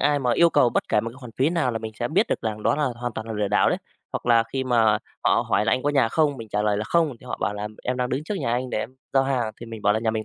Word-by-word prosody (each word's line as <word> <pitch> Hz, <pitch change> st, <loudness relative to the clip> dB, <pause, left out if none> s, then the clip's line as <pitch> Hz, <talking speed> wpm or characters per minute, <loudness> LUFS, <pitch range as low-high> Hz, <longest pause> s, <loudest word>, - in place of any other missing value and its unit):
ai 145 Hz, -1 st, +3 dB
mà 125 Hz, -3 st, +1 dB
yêu 170 Hz, 0 st, +5 dB
cầu 125 Hz, -, +4 dB
bất -, -, +1 dB
kể 105 Hz, -, +3 dB
một 115 Hz, -, -5 dB
cái 120 Hz, -, -15 dB
khoản 125 Hz, -3 st, -9 dB
phí 135 Hz, +4 st, +2 dB
nào 165 Hz, -7 st, +1 dB
là 115 Hz, -, -2 dB
mình 110 Hz, -1 st, -6 dB
sẽ 120 Hz, -, -1 dB
biết 190 Hz, +8 st, +2 dB
được -, -, -1 dB
rằng 110 Hz, -2 st, -3 dB
đó -, -, +3 dB
là 150 Hz, -, +1 dB
hoàn 120 Hz, 0 st, -4 dB
toàn 110 Hz, 0 st, -6 dB
là 115 Hz, -, -4 dB
lừa 105 Hz, -2 st, -1 dB
đảo 105 Hz, -, +3 dB
đấy. -, -, 0 dB, 0.3 s
Hoặc -, -, -4 dB
là 115 Hz, -1 st, +5 dB
khi 135 Hz, -1 st, -1 dB
mà 115 Hz, -4 st, +3 dB, 0.3 s
họ -, -, +3 dB
hỏi 105 Hz, -, +2 dB
là -, -, +2 dB
"Anh 130 Hz, -, +1 dB
có 145 Hz, -, +1 dB
nhà 135 Hz, -5 st, +3 dB
không?" 150 Hz, +1 st, +1 dB
Mình 115 Hz, -2 st, -8 dB
trả 105 Hz, 0 st, -1 dB
lời 105 Hz, -1 st, +1 dB
là" 105 Hz, -, -2 dB
Không," 165 Hz, +1 st, +2 dB
thì -, -, -16 dB
họ 125 Hz, -, -4 dB
bảo 105 Hz, -, 0 dB
là 105 Hz, +1 st, -4 dB, 0.2 s
"Em 125 Hz, -, -1 dB
đang 125 Hz, 0 st, -1 dB
đứng 135 Hz, +4 st, -2 dB
trước 210 Hz, -, -3 dB
nhà 125 Hz, -7 st, -1 dB
anh 125 Hz, +1 st, -1 dB
để -, -, -1 dB
em 120 Hz, +4 st, -5 dB, 0.2 s
giao 135 Hz, -, +4 dB
hàng," 125 Hz, -5 st, -1 dB
thì 120 Hz, -, -7 dB
mình 115 Hz, -2 st, -8 dB
bảo 105 Hz, -, +4 dB
là 110 Hz, -, +1 dB
"Nhà 110 Hz, 0 st, 0 dB
mình 110 Hz, -1 st, -3 dB
120 Hz, 355 wpm, -24 LUFS, 110-135 Hz, 0.3 s, yêu